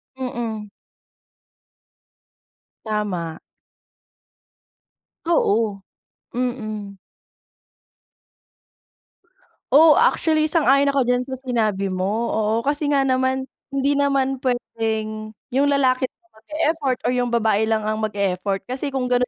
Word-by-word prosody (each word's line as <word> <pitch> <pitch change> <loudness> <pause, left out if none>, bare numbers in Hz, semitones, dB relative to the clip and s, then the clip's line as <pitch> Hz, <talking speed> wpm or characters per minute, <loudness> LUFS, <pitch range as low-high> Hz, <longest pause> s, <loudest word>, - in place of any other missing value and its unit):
Mm. 235 -5 -4 2.2
Tama. 190 -7 -3 1.9
Oo. 220 - +1 0.6
Mm. 215 -5 -3 2.8
Oo, 310 +1 +7
actually 320 -10 +3
sang-ayon 285 -3 +3
ako 280 -1 +2
diyan 250 0 +2
sa 265 - -4
sinabi 215 -6 0
mo 185 0 -1 0.3
oo 215 0 +1 0.2
kasi 290 0 0
nga 280 -1 +3
naman, 260 0 +1 0.2
hindi 280 +1 0
naman 270 -2 +1
pwedeng 220 -3 -3 0.2
yung 275 +3 +2
lalaki 260 -2 +2
lang 345 +6 -40
mag-effort 305 -1 -1
o 245 - +1
yung 250 -1 0
babae 220 -2 +2
lang 220 -1 +1
ang 215 0 -1
mag-effort 200 -2 -1
kasi 260 +7 -4
kung 260 -2 -2
ganun 250 0 +3
245 Hz, 100 wpm, -22 LUFS, 215-275 Hz, 2.8 s, Oo